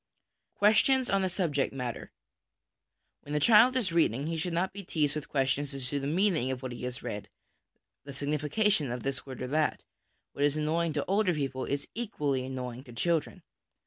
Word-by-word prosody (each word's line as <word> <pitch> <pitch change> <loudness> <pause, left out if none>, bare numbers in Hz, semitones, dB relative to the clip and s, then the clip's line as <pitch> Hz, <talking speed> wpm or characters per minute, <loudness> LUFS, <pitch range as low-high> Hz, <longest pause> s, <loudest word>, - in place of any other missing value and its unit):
Questions 240 +5 +4
on 195 0 +3
the 190 - +1
Subject 160 -7 0
matter. 125 -3 -5 1.1
When 145 - -5
a - - +3
child 235 - +6
is 225 -9 +2
reading, 145 -5 +2
he 165 +1 -2
should 165 +2 -1
not 175 +3 0
be 200 0 -7
teased 150 -5 0
with 150 -1 -5
questions 140 +1 0
as 130 -2 -3
to 145 - -1
the 135 - -3
meaning 165 -4 +2
of 130 0 -4
what 130 - -4
he 120 +1 -6
has 125 -1 -4
read, 105 0 -5 0.7
the 140 - -8
signification 150 - +1
of 125 -1 -4
this 135 0 -3
word 130 -1 -6
or - - -3
that; 155 +1 0 0.5
what 140 - -2
is 145 +1 +2
annoying 160 +2 0
to 145 - -1
older 195 -2 +2
people 135 -3 -2
is 140 +1 -2
equally 150 - -1
annoying 130 -1 -5
to 120 - -12
children. 165 +6 -1
145 Hz, 190 wpm, -29 LUFS, 130-175 Hz, 1.1 s, child